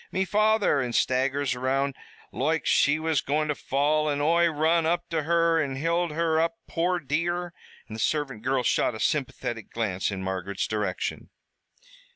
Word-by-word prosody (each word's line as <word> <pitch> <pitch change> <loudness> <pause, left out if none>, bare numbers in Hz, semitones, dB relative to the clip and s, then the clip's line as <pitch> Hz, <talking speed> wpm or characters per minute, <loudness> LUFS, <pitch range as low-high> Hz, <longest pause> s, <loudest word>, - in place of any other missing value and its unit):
Me 190 +1 0
father!' 210 -6 +2
an' 125 -2 -2
staggers 130 +2 +1
around 135 +2 -1 0.4
loike 160 +4 -1
she 145 +1 +3
was 155 -3 0
goin' 150 +2 0
to - - +2
fall, 150 +3 0
an' 145 -1 -1
Oi 170 +3 +3
run 160 +1 +2
up 175 +2 0
to 160 -1 0
her 165 +1 +2
an' 135 -3 -2
hild 170 +4 0
her 160 0 +1
up, 170 +7 -1
poor 180 +2 0
dear." 170 +4 -2 0.3
And - - -10
the - - -7
servant 135 -4 -1
girl 130 +1 0
shot 115 - +1
a - - -7
sympathetic 125 -6 -2
glance 100 -5 -2
in 95 -2 -4
Margaret's 95 +1 -3
direction. 105 -4 -3
150 Hz, 170 wpm, -26 LUFS, 130-165 Hz, 0.4 s, she